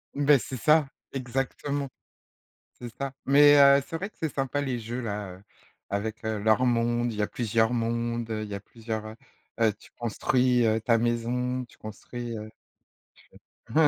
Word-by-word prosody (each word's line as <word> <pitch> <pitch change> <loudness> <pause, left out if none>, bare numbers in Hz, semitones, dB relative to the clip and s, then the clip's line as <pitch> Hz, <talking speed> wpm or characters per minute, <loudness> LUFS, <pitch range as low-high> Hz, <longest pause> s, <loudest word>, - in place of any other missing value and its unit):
Beh, 145 0 +5
c'est 130 - -6
ça, 150 +4 +4 0.3
exactement. 135 +2 -2 0.9
C'est 120 - -8
ça. 140 -1 -3
Mais, 145 +1 +7
heu, 140 0 +7
c'est - - -6
vrai 195 +5 -3
que - - -38
c'est 160 -2 -2
sympa 135 +1 -1
les 130 -4 -2
jeux 120 +3 -5
là, 105 -4 -4
heu 95 - -18 0.5
,avec, 110 +2 -3
heu, 110 -1 -1
leurs 110 +4 +3
mondes, 120 0 +1
il 105 - -6
y - - +2
a 105 - +1
plusieurs 115 0 +1
mondes, 115 0 -1
heu, 110 -1 -2
il 105 - -8
y 100 - -3
plusieurs, 110 +1 -6
heu 110 0 -8 0.4
heu, 110 -2 +3
tu - - -18
construis, 125 +2 +2
heu, 110 0 +2
ta 115 +1 +3
maison, 120 +2 -1
tu 120 - -22
construis, 115 +2 -7
heu, 105 0 -7 1.2
tu - - -11
120 Hz, 175 wpm, -27 LUFS, 110-130 Hz, 1.2 s, Mais